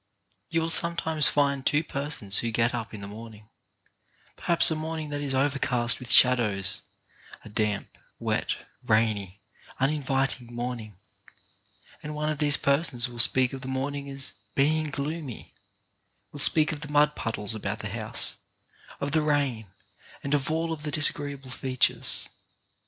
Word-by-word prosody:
You 165 0 +1
will 165 0 -1
sometimes 160 -2 +3
find 140 -2 +1
two 145 +3 +2
persons 140 -9 -1
who 115 - -1
get 115 +1 +1
up 115 -2 -4
in 105 - -8
the 100 - -7
morning, 110 0 -11 0.9
perhaps 170 -1 +3
a - - +1
morning 155 -1 -4
that 145 0 -3
is 140 -2 -1
over 140 +1 +1
cast 120 -2 +1
with 125 -3 -3
shadows 105 -7 +5 0.3
— - - -19
a - - -9
damp, 105 -1 -2 0.2
wet, - - -1 0.3
rainy, 105 -3 0 0.4
uninvit 135 -2 0
ing 120 0 -12
morning 120 -4 -5 0.6
— 100 +3 -29
and 150 0 -6
one 150 +1 -1
of 150 - -4
these 145 -2 +4
persons 140 -4 +1
will 120 -1 -10
speak 130 +2 +5
of 135 - -6
the 130 - -7
morning 140 +2 -3
as 135 0 -6 0.2
being 155 +2 +2
gloomy, 145 -2 -5 0.8
will 145 - -9
speak 155 +2 +4
of 150 -1 -6
the 150 - -6
mud 150 0 +3
puddles 110 -2 -2
about 105 -1 -3
the 105 - -5
house, 110 +1 -4 0.6
of 140 - -2
the 155 +1 +3
rain, 140 -7 0 0.6
and 140 - -2
of 145 -1 +1
all 165 +1 -1
of 155 - -7
the 150 - -3
disagreeable 145 -3 +1
features. 130 0 0
135 Hz, 165 wpm, -27 LUFS, 115-150 Hz, 0.9 s, shadows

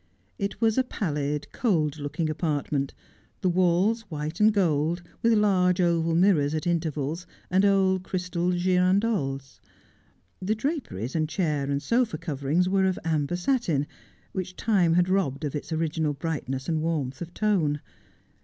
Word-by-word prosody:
It 200 0 -3
was 225 +1 +3
a - - +4
pallid, 150 - -2
cold 160 - 0
looking 150 +3 -2
apartment, 145 -3 -1 0.5
the 185 - +2
walls 185 +5 +2
white 155 +1 -4
and 215 +1 +6
gold, 170 -3 +1 0.2
with 230 0 +4
large 190 -4 +3
oval 165 -2 +2
mirrors 165 -5 +3
at 155 - -3
intervals, 160 -1 -1 0.2
and 190 +2 +4
old 190 -2 +3
crystal 180 -1 -2
girandoles. 180 -6 +1 0.8
The 205 +4 0
draperies 215 - -3
and 155 -1 0
chair 150 -7 -1
and 140 0 -1
sofa 235 -8 +1
coverings 155 +2 0
were 190 0 +2
of 185 -1 +1
amber 155 0 0
satin, 175 - 0 0.5
which 185 -1 -4
time 185 -7 +2
had 175 0 +3
robbed 170 -7 0
of 145 - -3
its 150 - -5
original 160 -1 0
brightness 135 -3 -3
and 160 -2 0
warmth 150 -5 -2
of 170 0 -6
tone. 175 -9 +1
170 Hz, 145 wpm, -26 LUFS, 150-190 Hz, 0.8 s, and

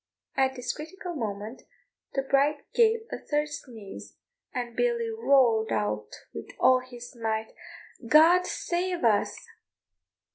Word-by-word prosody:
At 265 -1 +2
this 250 -1 -3
critical 355 +4 -7
moment 220 -3 -5 0.5
the 270 - +1
bride 280 +2 +2
gave 455 -1 +4
a - - -4
third 295 0 -1
sneeze, 230 -8 -9 0.4
and 240 -2 -4
Billy 470 - +1
roared 265 - +3
out 105 0 -1 0.2
with - - -7
all 255 0 +6
his 245 0 -11
might, 220 -1 -2 0.5
"God 335 +7 +6
save 355 -1 -2
us!" 215 -3 +1
265 Hz, 120 wpm, -27 LUFS, 225-345 Hz, 0.5 s, all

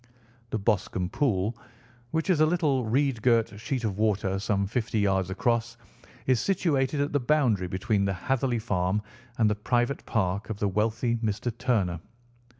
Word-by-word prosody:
The 110 - -1
Boscombe 95 -3 0
Pool, 110 -5 0 0.5
which 160 +5 -1
is 170 - +2
a 155 - +6
little 150 -7 +1
reed 130 +1 +1
girt 115 -3 +2
sheet 125 +2 -3
of 105 -3 -2
water 100 -3 +1
some 100 -1 0
fifty 110 +2 -2
yards 95 -2 +1
across, 120 +3 0 0.5
is 130 -3 +3
situated 150 - +1
at 145 - -1
the 145 - +3
boundary 120 -8 +2
between 100 +3 0
the 100 - 0
Hatherley 130 +5 0
Farm 105 -2 0 0.3
and 110 - +4
the 105 - +2
private 120 +5 0
park 100 -1 -1
of 110 - -3
the 105 - 0
wealthy 115 +4 0
Mr. 110 +1 -2
Turner. 110 -9 0
110 Hz, 160 wpm, -27 LUFS, 100-130 Hz, 0.5 s, a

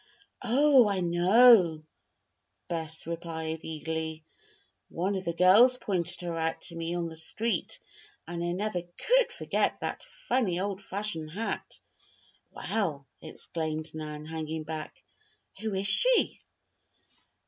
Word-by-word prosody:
"Oh! 260 0 +5
I 195 -2 0
know," 175 -1 +6 0.8
Bess 160 -2 -3
replied 165 -1 -4
eagerly. 160 0 -4 0.6
"One 185 +4 -1
of 190 -1 -3
the 170 - 0
girls 210 +9 +6
pointed 180 -8 -2
her 170 -1 -3
out 160 0 -1
to 170 - -8
me 165 +1 -3
on 175 -1 -1
the 165 - -8
street 185 +5 -2 0.5
and 170 0 -4
I 175 - -1
never 190 -1 -2
could 465 - +1
forget - - -1
that - - -3 0.3
funny, 195 -9 +1
old 195 0 -3
fashioned 195 -5 -3
hat." 210 +8 -4 0.7
"Well!" 160 -11 -2 0.2
exclaimed 155 0 -5
Nan, 150 -1 -6
hanging 160 0 -4
back, 155 0 -7 0.6
"who 220 -3 -3
is 195 +1 0
she?" - - +2
175 Hz, 125 wpm, -29 LUFS, 160-205 Hz, 0.8 s, know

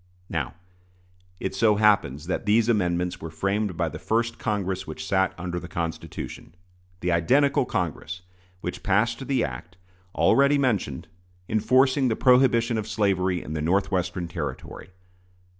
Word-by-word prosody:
Now, 80 -4 -3 0.8
it 95 - -3
so 105 +2 +3
happens 100 -9 +2
that 90 - -3
these 110 +2 +4
amendments 90 -5 0
were 80 - -5
framed 95 +3 -1
by - - +1
the - - -6
first 115 +1 -1
Congress 95 -3 -2
which 80 0 -6
sat 95 +1 +2
under 90 0 -4
the - - -9
Constitution 85 0 -6 0.5
the 90 - 0
identical 135 - +3
Congress 90 -4 -3 0.4
which 90 - -5
passed 115 +6 +1
the 135 -2 +1
act, 70 +8 -6 0.4
already 140 +1 +4
mentioned, 105 - -1 0.4
enforcing 130 +5 +3
the 115 - +1
prohibition 120 -3 +4
of 105 - -5
slavery 95 -4 0
in 75 - -6
the 80 - -2
Northwestern 90 0 0
Territory. 85 - -6
95 Hz, 140 wpm, -25 LUFS, 85-115 Hz, 0.8 s, these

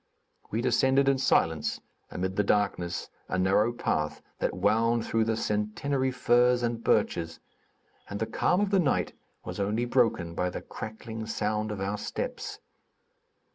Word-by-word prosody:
We 110 - -1
descended 130 +2 +3
in 135 -1 +3
silence, 80 - +2 0.3
amid 95 +1 -3
the 105 - +2
darkness, 100 -4 0 0.2
a - - 0
narrow 100 +5 +3
path 75 -10 -1 0.2
that - - -1
wound 110 +4 +2
through 115 -1 +1
the 110 0 0
centennary 115 +7 0
firs 125 -1 +3
and 115 -1 -1
birches, 85 -1 +1 0.7
and 100 - -4
the 110 - 0
calm 180 - +1
of 205 -1 0
the 195 - +4
night 90 - +1 0.3
was - - -6
only 105 +4 0
broken 115 -9 +1
by 90 +2 0
the - - -6
crackling 110 0 -7
sound 105 0 -1
of 105 - -4
our 100 +2 -2
steps. - - -4
110 Hz, 150 wpm, -28 LUFS, 95-120 Hz, 0.7 s, the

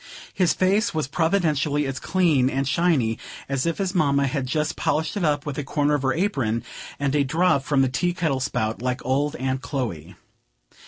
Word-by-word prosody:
His 180 -3 +2
face 200 +2 +2
was 155 -4 0
providentially 155 -3 +1
as 135 -1 -3
clean 160 -9 +2
and 135 0 -1
shiny 140 -8 +1 0.3
as 140 +3 -1
if 165 - -1
his 195 -2 -1
mamma 140 -5 +2
had 135 -1 -2
just 150 +3 -1
polished 160 +5 -1
it 200 - -2
up 145 -3 +1
with 145 -1 -4
a - - -2
corner 145 +1 0
of 145 - +1
her 135 -1 +1
apron 130 - 0 0.4
and 140 -1 0
a 145 -1 +3
drop 160 +1 +2
from 140 -1 +2
the - - +2
tea 175 +7 -1
kettle 155 -7 0
spout, 115 -4 -2
like 125 -1 -2
old 140 +3 0
Aunt 130 0 -2
Chloe. 115 - -4
145 Hz, 195 wpm, -24 LUFS, 130-165 Hz, 0.4 s, a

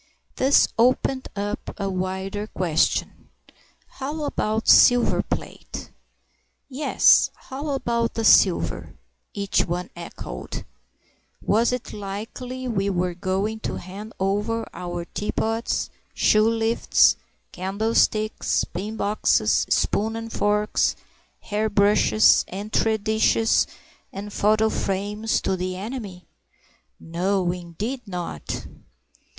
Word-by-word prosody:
This 270 +2 +5
opened 260 +2 +2
up 205 +1 -4
a 200 - -1
wider 190 +2 -3
question. 170 -6 -1 0.6
How 295 +3 -5
about 220 -5 -1
silver 245 -1 +6
plate? - - -6 0.8
Yes, 280 +2 +4
how 280 +3 -7
about 235 -4 -1
the 225 - -1
silver? 185 -4 +3 0.4
each 200 -1 0
one 175 +1 -3
echoed. 170 -1 -7 0.7
Was 230 +4 +2
it 250 -1 -4
likely 225 +6 -6
we 200 -4 0
were 180 -1 -1
going 195 +4 -2
to - - -4
hand 200 +5 -8
over 210 +4 0
our 175 0 -5
teapots, 225 +4 -2 0.2
shoelifts, 225 +1 +3 0.4
candlesticks, 215 +3 0
pin 205 +6 -5
boxes, 210 0 +2
spoons 220 +2 +1
and 225 0 -6
forks, 210 +1 +1 0.5
hair 215 +1 -1
brushes, 210 +1 +4
entrée 215 +3 0
dishes, 220 +1 +3 0.4
and 205 +1 -7
photo 215 +1 +3
frames 205 +2 -1
to 190 - 0
the 185 0 -3
enemy? 200 -3 -7 0.7
No, 180 +2 0
indeed 180 +9 -5
not! 175 - -5
210 Hz, 100 wpm, -24 LUFS, 190-225 Hz, 0.8 s, silver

